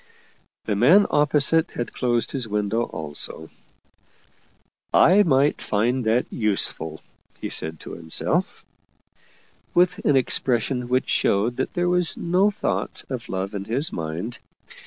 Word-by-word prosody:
The 105 - -1
man 160 - +5
opposite 150 +3 +3
had 120 - -5
closed 120 -2 0
his 130 -5 -2
window 105 +2 -1
also. 80 0 -6 0.7
" - - -38 0.2
I 200 +3 +6
might 145 -5 +2
find 120 +4 0
that 115 +3 +2
useful," 95 -7 -2 0.4
he - - -5
said 80 0 0
to - - -9
himself, 80 -1 -2 1.1
with 180 +1 +3
an 145 - +3
expression 125 -1 0
which 130 0 +1
showed 110 +5 +1
that 130 - -2
there 175 0 0
was 180 -1 +1
no 185 +4 +2
thought 205 - -3
of - - -5
love 95 +2 -3
in 100 -1 -5
his 130 +8 0
mind. 85 +9 -5
120 Hz, 135 wpm, -23 LUFS, 100-145 Hz, 1.1 s, I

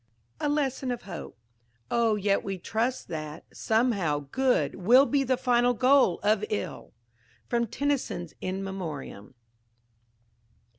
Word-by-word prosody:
A 295 - 0
LESSON 275 -3 -1
OF 245 -1 -3
HOPE 175 -4 -8 0.5
"Oh, 230 -2 +3
yet 200 -1 +1
we 195 -1 -3
trust 230 +7 -2
that, 155 -1 -6
somehow, 205 -10 +1
good 260 -1 +2
Will 240 +9 +5
be 280 -1 +1
the 260 -1 +1
final 245 -1 +2
goal 255 -7 +4
of 210 0 +2
ill!" 210 - -4 0.5
From 235 -1 0
TENNYSON'S 270 - -2
"In 190 +1 -3
Memoriam." 155 - -6
225 Hz, 120 wpm, -27 LUFS, 190-255 Hz, 0.5 s, Will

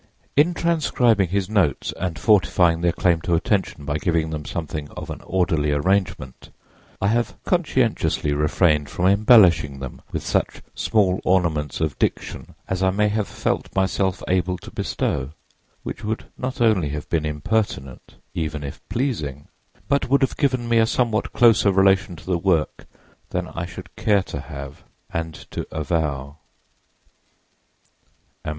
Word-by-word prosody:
In 165 +5 +4
transcribing 125 - +2
his 95 0 0
notes 95 -10 +1
and 90 -3 -3
fortifying 90 -6 +3
their 85 0 +3
claim 85 -1 +1
to 85 +1 +1
attention 90 -4 -1
by 75 +1 -1
giving 80 -3 0
them 75 -1 -5
something 75 -3 -5
of - - -6
an - - -7
orderly 80 -5 +1
arrangement, 85 -4 -1 0.5
_I 100 - +1
have 120 +2 0
conscientiously 130 - +1
refrained 75 0 +2
from 90 - -2
embellishing 100 - +5
them 65 -2 -8
with - - -4
such - - -1
small 95 -4 +1
ornaments 80 -7 +1
of 80 -3 -1
diction - - -2
as 95 -1 -2
I 95 - +4
may 105 +2 +2
have 105 -1 -1
felt - - -2
myself 95 -1 0
able 90 0 +1
to - - -12
bestow_, 70 +1 -2 0.5
which 105 - -6
would 110 +1 -3
not 130 +1 -4
only 105 -10 +3
have 75 0 -5
been 80 -2 0
impertinent, 75 - -2 0.2
even 75 -3 -3
if 70 - -7
pleasing, 75 - -3 0.4
but 140 -2 +1
would 140 +1 +4
have 135 - 0
given 130 -5 0
me 115 -1 +3
a 110 - +4
somewhat 115 -2 0
closer 115 -4 +5
relation 95 -2 +3
to 80 - -14
the 90 -2 0
work 85 -4 0 0.4
than - - -3
I 85 +1 -5
should - - -11
care 100 -3 +2
to 70 - -6
have 70 -2 -9 0.3
and 80 -1 -3 0.2
to - - -4
avow.—_A. 75 -2 -2
90 Hz, 150 wpm, -22 LUFS, 75-105 Hz, 0.5 s, embellishing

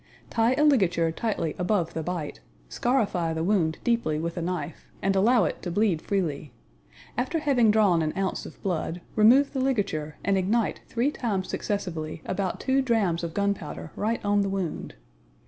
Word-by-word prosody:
Tie 230 +2 +3
a 295 - +2
ligature 185 - +3
tightly 165 -5 -2
ABOVE 180 -2 0
the 165 - -2
bite, 165 -2 -4 0.3
scarify 200 - 0
the 160 0 -2
wound 170 -4 +1
deeply 235 -11 +1
with 170 +2 -3
a 175 - -3
knife, 175 0 -4
and 195 +1 +1
allow 225 +4 +4
it - - -3
to 180 - -4
bleed 180 -3 +1
freely. 155 -9 -2 0.7
After 260 +6 0
having 270 -7 +3
drawn 205 -6 +4
an 155 -1 0
ounce 195 -1 -2
of - - -13
blood, 175 -2 -2
remove 250 +6 +5
the 270 - -1
ligature 200 - -1
and 195 -1 +2
ignite 215 +4 0
three 250 +5 0
times 205 -9 -2
successively 165 -7 -3
about 190 -1 -2
two 270 0 +2
drams 210 -10 +1
of 165 -1 -4
gunpowder 200 -6 -2
right 220 +1 -1
on 205 0 +3
the 200 - 0
wound. 190 - -4
195 Hz, 170 wpm, -26 LUFS, 170-230 Hz, 0.7 s, remove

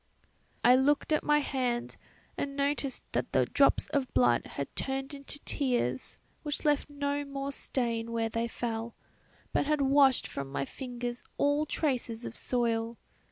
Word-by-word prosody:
"I 245 +1 +8
looked 290 +4 +3
at 305 - +3
my 295 0 +4
hand 250 -4 -1 0.4
and 275 -1 -3
noticed 280 -1 0
that - - -2
the - - +4
drops - - +3
of 275 -3 0
blood 120 -1 +4
had 140 - -4
turned 270 +1 -2
into 280 0 -4
tears 240 - 0 0.2
which 295 -1 -3
left 295 0 +2
no 285 0 -1
more 275 0 -4
stain 230 -4 -1
where 230 -1 0
they 230 +1 -1
fell, 230 -1 -4 0.6
but - - +2
had 300 -1 +2
washed 275 -1 +5
from 140 -1 -5
my 140 - -1
fingers 245 - -5
all 290 +2 +2
traces 245 -7 -1
of - - -6
soil. 230 -2 0
265 Hz, 155 wpm, -30 LUFS, 230-285 Hz, 0.6 s, I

